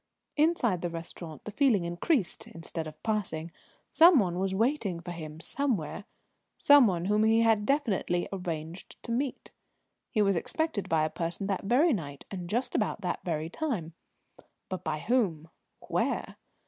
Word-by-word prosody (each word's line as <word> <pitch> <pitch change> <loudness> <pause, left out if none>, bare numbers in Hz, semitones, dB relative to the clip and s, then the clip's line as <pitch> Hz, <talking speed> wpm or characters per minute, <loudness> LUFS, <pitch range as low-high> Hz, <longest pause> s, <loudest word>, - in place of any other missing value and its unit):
Inside 295 - +2
the 175 - -1
restaurant 165 -1 -7
the 210 - -5
feeling 220 -7 +3
increased, 175 - -1
instead 165 -1 -6
of 155 - -12
passing: 185 -7 -2 0.4
some 335 0 +7
one 180 -6 +1
was 190 0 0
waiting 225 - 0
for 175 +1 -7
him 155 -2 -7
somewhere 205 - -2 0.5
some 285 -4 +7
one 175 -3 -1
whom 210 +2 +3
he 225 +1 +4
had 220 -2 +3
definitely 205 -11 +1
arranged 170 -2 -5
to 235 - -6
meet. 255 +2 -2 0.6
He 215 -4 +2
was 195 -1 +3
expected 270 - -2
by 160 -1 +3
a 155 - -3
person 170 +4 -3
that 195 -1 -2
very 270 - +4
night 145 - -5
and 180 -3 -5
just 245 +4 -1
about 210 -1 0
that 180 - -2
very 160 -2 -2
time. 205 - -3 0.8
But 185 -1 -4
by 150 - -2
whom? 190 -10 0 0.3
Where? - - -2
195 Hz, 160 wpm, -29 LUFS, 170-235 Hz, 0.8 s, some